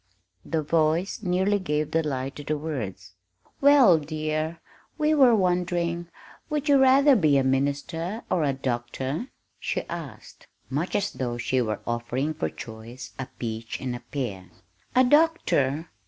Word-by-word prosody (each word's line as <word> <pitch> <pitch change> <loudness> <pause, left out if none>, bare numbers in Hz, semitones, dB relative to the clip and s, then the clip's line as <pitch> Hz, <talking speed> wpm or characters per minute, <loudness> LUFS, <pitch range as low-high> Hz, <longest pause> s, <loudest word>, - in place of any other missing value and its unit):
The 160 -2 -1
voice 160 +5 +1
nearly 190 +2 +1
gave 150 -4 -1
the 165 - +2
lie 135 -3 -3
to 145 - -9
the 150 +1 -1
words. 105 - -5 0.5
"Well, 270 - +7
dear, 155 +1 -3 0.4
we 305 0 +2
were 260 -6 +6
wondering 175 -2 0 0.4
would 300 -1 -2
you 285 -2 +5
rather 270 +2 +6
be 155 - +4
a 135 - +3
minister 145 - -1
or 175 -4 +1
a 140 - +2
doctor?" 130 - -3 0.3
she - - -2
asked, 155 -10 -9 0.2
much 155 +7 -2
as 205 0 0
though 120 -2 -3
she 125 +2 0
were 110 -3 -2
offering 120 +5 -2
for 80 - -2
choice 115 +6 -9
a 130 - -4
peach 115 -1 -4
and 125 -2 -3
a - - -6
pear. 120 - -5 0.5
"A 255 - +6
doctor!" 245 - +2
155 Hz, 150 wpm, -26 LUFS, 130-180 Hz, 0.5 s, Well